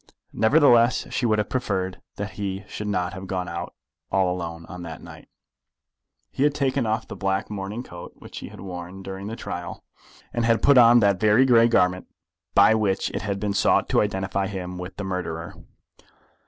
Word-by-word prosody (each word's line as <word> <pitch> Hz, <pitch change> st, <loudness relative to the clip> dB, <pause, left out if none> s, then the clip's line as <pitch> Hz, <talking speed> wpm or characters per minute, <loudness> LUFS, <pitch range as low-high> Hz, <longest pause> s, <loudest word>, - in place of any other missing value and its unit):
Nevertheless 120 Hz, -1 st, +4 dB
she 120 Hz, -, +1 dB
would 110 Hz, -1 st, +2 dB
have 105 Hz, -1 st, -1 dB
preferred 95 Hz, -7 st, -2 dB
that 105 Hz, +1 st, -5 dB
he 100 Hz, -1 st, -4 dB
should 105 Hz, -, -6 dB
not 90 Hz, -2 st, -1 dB
have 95 Hz, 0 st, -8 dB
gone 90 Hz, -1 st, -3 dB
out 85 Hz, +1 st, -6 dB, 0.4 s
all 95 Hz, -2 st, +2 dB
alone 85 Hz, -2 st, -6 dB
on 90 Hz, -1 st, -9 dB
that 85 Hz, -1 st, -8 dB
night. -, -, -13 dB, 1.0 s
He -, -, -5 dB
had 145 Hz, 0 st, +3 dB
taken 135 Hz, -4 st, 0 dB
off 110 Hz, +1 st, -1 dB
the -, -, -7 dB
black 95 Hz, +1 st, -2 dB
morning 105 Hz, +4 st, -5 dB
coat 85 Hz, -6 st, -10 dB
which -, -, -10 dB
he -, -, -8 dB
had -, -, -12 dB
worn 90 Hz, 0 st, -8 dB
during 95 Hz, +1 st, -6 dB
the 110 Hz, -, -5 dB
trial, 90 Hz, -6 st, -6 dB, 0.5 s
and 120 Hz, -, 0 dB
had 115 Hz, 0 st, +2 dB
put 140 Hz, -2 st, +7 dB
on 120 Hz, 0 st, +7 dB
that 100 Hz, -3 st, +3 dB
very 110 Hz, +5 st, +5 dB
grey 115 Hz, -2 st, +6 dB
garment 90 Hz, -5 st, +2 dB, 0.5 s
by -, -, +7 dB
which 105 Hz, -3 st, 0 dB
it -, -, -3 dB
had 100 Hz, 0 st, -3 dB
been 100 Hz, 0 st, -1 dB
sought 100 Hz, -, +3 dB
to -, -, +3 dB
identify 95 Hz, -1 st, -1 dB
him 90 Hz, -2 st, -6 dB
with 90 Hz, +1 st, -8 dB
the 105 Hz, -, -4 dB
murderer. 90 Hz, -1 st, -4 dB
100 Hz, 190 wpm, -24 LUFS, 90-110 Hz, 1.0 s, put